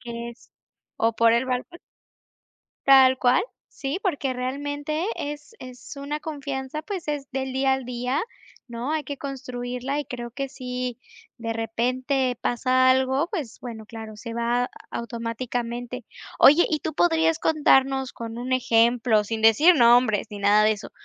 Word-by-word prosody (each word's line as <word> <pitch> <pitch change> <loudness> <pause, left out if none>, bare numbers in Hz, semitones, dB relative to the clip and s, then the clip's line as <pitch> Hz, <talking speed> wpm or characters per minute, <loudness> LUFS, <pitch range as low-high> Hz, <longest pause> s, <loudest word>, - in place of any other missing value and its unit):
Que 235 0 -6
es 235 - -18 0.5
O 225 +1 +2
por 230 0 +4
el 235 +2 +2
balcón. 260 +7 -3 1.1
Tal 265 -1 +7
cual. 255 +7 +3 0.3
Sí, 275 +6 -4
porque 290 -9 -1
realmente, 290 +6 -3
es 295 +7 -6
es 255 +2 -10
una 285 +2 -4
confianza, 285 -1 -5
pues, 375 -2 -6
es 290 -2 -3
del 265 0 -3
día 265 +1 +2
al 265 -1 -1
día, 250 +3 -2 0.5
¿no?, 240 +5 -4
hay 315 - 0
que 280 +1 -6
construirla, 255 0 -4
y 295 - -2
creo 240 -1 -6
que 275 +3 -4
si 250 -2 -5 0.4
de 230 -2 -3
repente 250 +3 -1
pasa 255 +1 +2
algo, 265 +4 +2
pues, 315 - -5
bueno, 225 -3 -8
claro, 220 -1 -9
se 230 +2 -7
va 240 +1 0 0.2
automáticamente. 235 +1 -4 0.3
Oye, 300 +5 +7
y 310 - +1
tú 315 0 -5
podrías 325 -1 +2
contarnos, 270 -4 +3
con 230 0 -7
un 250 +2 -3
ejemplo, 230 -2 +3
sin 220 +1 -4
decir 255 +11 +6
nombres 235 - +4
ni 205 - -7
nada 205 +1 +4
de 215 - +5
eso, 205 - -8
255 Hz, 155 wpm, -24 LUFS, 235-280 Hz, 1.1 s, Tal